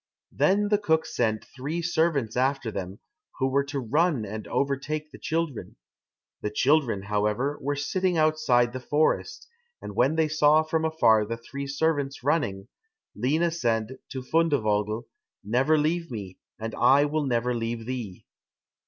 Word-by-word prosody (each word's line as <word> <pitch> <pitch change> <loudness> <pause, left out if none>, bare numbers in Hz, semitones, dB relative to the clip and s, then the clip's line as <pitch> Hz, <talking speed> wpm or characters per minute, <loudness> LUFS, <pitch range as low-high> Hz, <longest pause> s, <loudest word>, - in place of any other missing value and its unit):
Then 205 +2 +2
the 210 -1 +3
cook 160 -5 +1
sent 110 -2 -1
three 150 +6 -5
servants 160 -8 +1
after 130 -2 0
them, 95 -1 -5 0.4
who 130 - +1
were 140 +1 +2
to 140 0 -3
run 145 0 +1
and 105 +1 -6
overtake 145 +3 -2
the - - -12
children. 160 -5 -3 0.7
The 105 - -2
children, 125 -3 +2
however, 105 +7 -1
were 145 +1 -1
sitting 180 +5 0
outside 155 -7 +3
the 130 - -4
forest, 155 - 0 0.3
and - - -8
when 135 +6 +3
they 160 -1 +2
saw 155 0 +4
from 160 0 -1
afar 115 -9 +4
the 115 +1 -3
three 140 +4 -7
servants 140 -2 -1
running, 125 -10 0 0.5
Lina 155 +9 +1
said 120 -4 -1
to 130 -1 -5
Fundevogel, 115 -8 +1 0.4
"Never 130 +9 +2
leave 165 +3 0
me, 100 -6 -7 0.2
and 110 0 -5
I 140 +2 +5
will 150 -1 -1
never 125 0 0
leave 115 -1 -3
thee." 120 -7 -6
140 Hz, 150 wpm, -26 LUFS, 115-155 Hz, 0.7 s, I